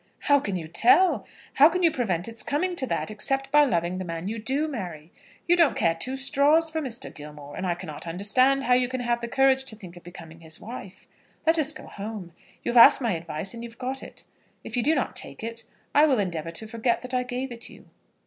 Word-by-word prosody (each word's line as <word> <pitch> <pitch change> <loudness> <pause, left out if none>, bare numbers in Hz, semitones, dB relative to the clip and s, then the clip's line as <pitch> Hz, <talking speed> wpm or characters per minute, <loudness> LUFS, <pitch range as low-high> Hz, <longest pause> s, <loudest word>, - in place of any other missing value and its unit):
"How 285 0 +4
can 200 -7 -4
you 170 -3 -4
tell? 370 - +4 0.3
How 290 +3 +8
can 365 +2 -2
you 335 - +5
prevent 195 - -2
its 230 0 +1
coming 355 +6 -1
to 260 - -2
that, - - -2
except 270 +5 -2
by 295 +1 +6
loving 175 -5 -1
the - - -3
man 165 0 -5
you 225 +2 -4
do 270 +7 -1
marry? 175 - -7 0.4
You 350 - +5
don't 335 -5 +3
care 165 - +2
two 255 +11 -4
straws 290 +4 +2
for 320 0 -2
Mr. 255 -5 -5
Gilmore; 150 -1 -11
and 185 - -3
I 175 - 0
cannot 165 -2 -8
understand 255 +10 +2
how 250 - +3
you 250 0 +3
can 255 0 -4
have 240 -1 -1
the 235 - -4
courage 265 +1 +3
to 230 - -6
think 185 -5 -12
of 175 - -14
becoming 165 -2 -12
his 160 -1 -7
wife. 215 -5 -10 0.4
Let 325 0 +3
us 305 -1 +3
go 305 - -10
home. 200 -4 -8 0.3
You - - -1
have 245 - +1
asked - - +7
my 235 -3 0
advice, 170 +2 -2
and 235 0 -8
you've 235 0 -10
got 265 +1 -4
it. - - -11 0.4
If - - -7
you 245 - +2
do 305 +7 +3
not 265 - -2
take - - -3
it, 230 0 -5 0.3
I 295 +2 +6
will 270 -4 +2
endeavour 170 -5 -2
to 170 +6 -5
forget 230 +2 -1
that 250 +1 -7
I 250 - +2
gave 250 +1 -4
it 235 -1 -7
you." - - -15
235 Hz, 240 wpm, -25 LUFS, 180-270 Hz, 0.4 s, How